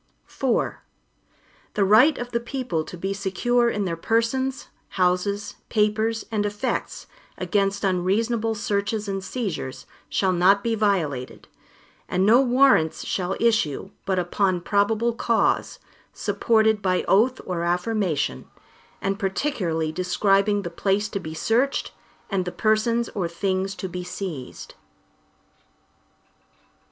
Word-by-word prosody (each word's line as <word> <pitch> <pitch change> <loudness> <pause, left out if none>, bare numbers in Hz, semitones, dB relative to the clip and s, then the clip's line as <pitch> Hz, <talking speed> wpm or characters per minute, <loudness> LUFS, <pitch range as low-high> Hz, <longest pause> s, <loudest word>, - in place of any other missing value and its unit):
IV 260 -4 0 1.0
The 200 - +3
right 235 +10 +6
of 245 0 -5
the 235 - 0
people 240 - -3
to 180 - -9
be 195 +3 -2
secure 235 +5 +1
in 205 -3 -1
their 170 -2 -2
persons, 230 +8 -1 0.3
houses, 185 +3 0
papers, 220 +1 +1
and 210 -2 0
effects, 210 +5 -3 0.3
against 200 -1 0
unreasonable 215 +5 +1
searches 205 +1 -1
and 195 -1 -3
seizures, 195 - -4 0.2
shall 190 -1 +1
not 190 +3 +4
be 230 - 0
violated, 175 - -1 0.6
and 185 +1 +1
no 235 +5 +6
Warrants 255 - +3
shall 185 0 -1
issue, 205 -6 +1 0.2
but 190 -1 +1
upon 180 0 +1
probable 215 +5 +1
cause, 230 0 +1 0.4
supported 220 -2 +2
by 185 -2 +1
oath 240 +6 +3
or 180 -2 -2
affirmation, 175 - -1 0.6
and 195 +1 -1
particularly 190 - -1
describing 195 +3 +2
the 170 - -5
place 200 +4 0
to 200 - -3
be 160 -3 -7
searched, 240 +11 0 0.4
and 190 -3 -1
the 180 - -3
persons 225 +3 +1
or 190 -5 -2
things 190 +2 -2
to 190 - -5
be 180 0 -5
seized. 180 -7 -7
200 Hz, 125 wpm, -24 LUFS, 185-225 Hz, 1.0 s, right